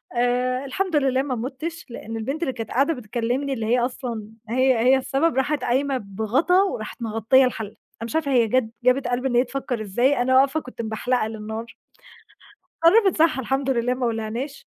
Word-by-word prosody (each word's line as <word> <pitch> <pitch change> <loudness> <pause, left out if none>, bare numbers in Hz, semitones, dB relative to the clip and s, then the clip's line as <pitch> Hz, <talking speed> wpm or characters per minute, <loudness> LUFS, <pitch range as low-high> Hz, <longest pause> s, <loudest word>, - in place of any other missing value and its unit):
آآ، 250 +2 0
الحمد 360 +5 -2
لله 265 -2 +2
ما 270 -2 -2
مُتْش، 275 +8 -5
لأن 225 -1 -7
البنت 275 +8 -4
اللي 265 - -1
كانت 225 -2 -6
قاعدة 280 +6 +2
بتكلمني 250 +3 -2
اللي 225 -3 -3
هي 245 +2 +2
أصلًا 240 -3 -3 0.2
هي 255 +1 +3
هي 255 +3 +5
السبب 270 +4 0
راحِت 280 +3 0
قايمة 265 +2 +1
بغطا 225 - +1
وراحِت 235 - -5
مغطية 225 +4 +3
الحلة، 225 -4 -3
أنا 220 - -15
مش 235 - -6
عارفة 295 -4 0
هي 240 -3 +4
جات 255 +4 +2 0.2
جابِت 250 +1 +3
قلب 245 +1 -1
إن 255 -2 0
هي 245 - +5
تفكر 255 -3 -4
إزاي، 240 +7 +1
أنا 260 +1 +2
واقفة 275 +3 +4
كنت 250 -4 -8
مبحلقة 220 +1 -1
للنار. 220 +1 -7 1.1
اتصرفِت 385 0 +5
صح 315 -3 +3
الحمد 270 +1 -1
لله 245 0 +1
ما 255 -1 -2
ولعناش 230 +5 -4
255 Hz, 185 wpm, -23 LUFS, 230-275 Hz, 1.1 s, هي